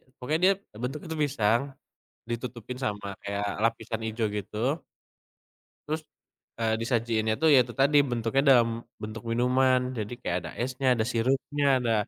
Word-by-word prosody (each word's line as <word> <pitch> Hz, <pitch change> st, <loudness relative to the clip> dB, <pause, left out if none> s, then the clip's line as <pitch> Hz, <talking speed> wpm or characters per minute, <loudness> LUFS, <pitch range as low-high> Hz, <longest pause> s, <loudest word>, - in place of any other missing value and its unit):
pokoknya 150 Hz, +6 st, -1 dB
dia 195 Hz, -, +6 dB, 0.3 s
bentuk 135 Hz, +4 st, -2 dB
itu 160 Hz, -, -4 dB
pisang, 115 Hz, -5 st, +2 dB, 0.7 s
ditutupin 120 Hz, +1 st, -5 dB
sama 105 Hz, -3 st, -3 dB, 0.2 s
kayak 100 Hz, 0 st, -2 dB, 0.2 s
lapisan 115 Hz, 0 st, -1 dB
hijau 110 Hz, 0 st, -1 dB
gitu. 105 Hz, +1 st, -6 dB, 1.3 s
Terus, 155 Hz, +1 st, -2 dB, 0.6 s
eee, 110 Hz, -1 st, +2 dB
disajiinnya 115 Hz, -2 st, +1 dB
tuh 160 Hz, -, +5 dB
ya 130 Hz, -, +7 dB
itu 120 Hz, -, -9 dB
tadi 140 Hz, +4 st, +3 dB
bentuknya 120 Hz, +1 st, 0 dB
dalam 120 Hz, -2 st, +6 dB, 0.3 s
bentuk 110 Hz, +1 st, -6 dB
minuman. 125 Hz, +1 st, +2 dB
Jadi 110 Hz, +1 st, -3 dB
kayak 90 Hz, -, -1 dB
ada -, -, -6 dB
esnya, 130 Hz, +1 st, -2 dB
ada 110 Hz, -, 0 dB
sirupnya, 135 Hz, +4 st, 0 dB
ada, 120 Hz, -2 st, +1 dB
120 Hz, 145 wpm, -28 LUFS, 110-130 Hz, 1.3 s, ya